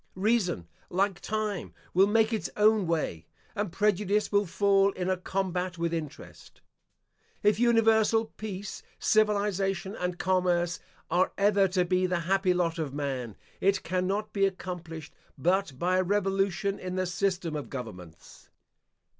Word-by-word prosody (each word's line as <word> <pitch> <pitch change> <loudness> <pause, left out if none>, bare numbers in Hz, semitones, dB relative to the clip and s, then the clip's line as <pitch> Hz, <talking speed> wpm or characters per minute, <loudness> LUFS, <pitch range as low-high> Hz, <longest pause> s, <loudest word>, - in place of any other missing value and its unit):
Reason, 190 - +1 0.2
like 190 +1 0
time, 215 -3 -3 0.2
will 190 +3 +5
make 220 +2 +3
its 220 - -2
own 210 -2 +4
way, 120 - -2 0.3
and 205 -4 -2
prejudice 210 +1 +1
will 205 -1 +2
fall 195 +2 +3
in 185 0 -2
a - - +2
combat 185 -1 -2
with 170 0 -1
interest. 155 -4 -7 0.8
If 210 +1 +3
universal 225 -1 +4
peace, 210 -2 -7 0.2
civilisation, 200 -2 +1
and 180 -2 -3
commerce 180 -1 +1 0.3
are 180 +2 +3
ever 200 -1 +4
to 185 -1 +1
be 185 +1 +2
the 180 -1 -1
happy 190 +2 +2
lot 170 -1 0
of 145 -4 -3
man, 130 -7 -3 0.2
it 195 0 +2
cannot 190 +3 -1
be 195 -1 +3
accomplished 175 -4 -7 0.2
but 175 -1 +1
by 180 +5 +1
a 185 - +3
revolution 195 0 0
in 185 0 -5
the 185 0 0
system 180 -3 -1
of 150 - -5
governments. 90 - -9
185 Hz, 140 wpm, -28 LUFS, 175-205 Hz, 0.8 s, will